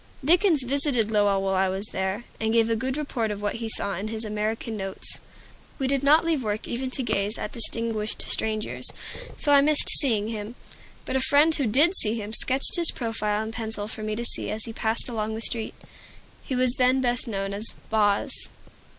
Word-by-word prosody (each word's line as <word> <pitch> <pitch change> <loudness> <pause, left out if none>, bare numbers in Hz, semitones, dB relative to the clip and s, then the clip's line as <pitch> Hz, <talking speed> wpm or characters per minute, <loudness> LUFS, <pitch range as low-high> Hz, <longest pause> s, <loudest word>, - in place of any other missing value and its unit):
Dickens 340 -2 +3
visited 250 -4 0
Lowell 205 -2 +2
while 195 0 -1
I 190 0 +1
was 190 +2 +1
there, 190 +4 -3 0.2
and 220 0 -1
gave 230 0 +2
a - - +2
good 260 +4 -3
report 255 -7 -3
of 205 -1 -5
what 205 +2 -3
he 225 -1 -5
saw 200 -2 -3
in 200 +4 -4
his 220 0 -3
"American 215 +2 -3
Notes." 195 -2 -4 0.6
We 270 - -2
did 270 0 0
not 300 +4 +4
leave 320 -4 +1
work 215 -2 -3
even 255 +2 -4
to 260 +1 -2
gaze 205 -2 -1
at 210 - -5
distinguished 225 -2 +1
strangers, 215 -1 0 0.5
so 290 - +1
I 285 -1 +6
missed 300 +1 +6
seeing 220 -7 +2
him. 220 +1 -6 0.5
But 265 - -1
a - - +1
friend 290 +4 +3
who 280 -5 -1
did 295 - +3
see 215 - +5
him 210 +1 -7
sketched 265 +7 +3
his 340 -1 +4
profile 215 -3 -2
in 220 - -6
pencil 220 -2 -4
for 215 - -7
me 215 0 -3 0.4
as 215 +1 -4
he 225 - -8
passed 220 0 +1
along 220 -2 -3
the - - -5
street. 230 -1 -1 0.7
He 260 - -5
was 250 -1 +2
then 255 +1 +3
best 245 0 0
known 195 -2 -4
as 210 +3 -1 0.2
"Boz." 205 -2 +1
225 Hz, 200 wpm, -25 LUFS, 210-260 Hz, 0.7 s, I